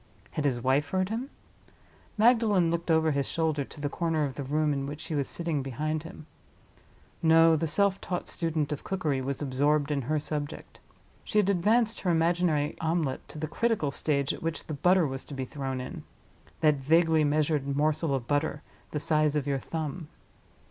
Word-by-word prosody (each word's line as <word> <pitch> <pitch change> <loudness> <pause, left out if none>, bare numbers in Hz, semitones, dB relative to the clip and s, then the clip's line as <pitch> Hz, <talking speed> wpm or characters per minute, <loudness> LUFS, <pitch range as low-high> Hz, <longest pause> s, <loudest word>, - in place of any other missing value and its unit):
Had 150 - -2
his 120 -4 0
wife 140 +3 +2
heard 185 0 0
him? 235 +5 -3 0.9
Magdalen 215 -6 +4
looked 170 +1 -3
over 160 -1 +3
his 140 -1 0
shoulder 160 -3 0
to 140 - -13
the 145 - -1
corner 160 0 -1
of 135 - -4
the 140 - -6
room 150 +2 +1
in 140 -1 -2
which 145 +1 -6
she - - -5
was 140 -3 0
sitting 165 -4 -1
behind 150 +4 -2
him. 165 -1 -11 1.0
No: 165 0 +6
the 160 +1 0
self 200 +4 +2
taught 180 -1 -3
student 160 -3 -1
of 150 - -4
cookery 155 -8 -1
was 135 +2 -3
absorbed 145 +2 +1
in 140 -2 0
her 155 +5 -1
subject. 150 0 -5 0.4
She 215 - -2
had 200 -1 +4
advanced 220 +5 +2
her 185 - 0
imaginary 165 -3 +2
omelette 160 -4 -1
to - - -11
the 155 - -2
critical 195 -3 0
stage 140 -1 0
at - - -9
which 165 0 -3
the 155 - -5
butter 180 +4 +3
was 135 -2 -4
to 145 - -8
be 130 -1 -3
thrown 135 -1 -4
in—that 145 +3 -3
vaguely 160 +3 +3
measured 145 -2 +1
morsel 155 0 +1
of 130 -3 -3
butter, 145 0 0 0.3
the 150 - -3
size 150 0 +1
of 145 -2 0
your 140 -1 0
thumb. 160 +2 -5
155 Hz, 185 wpm, -28 LUFS, 145-165 Hz, 1.0 s, No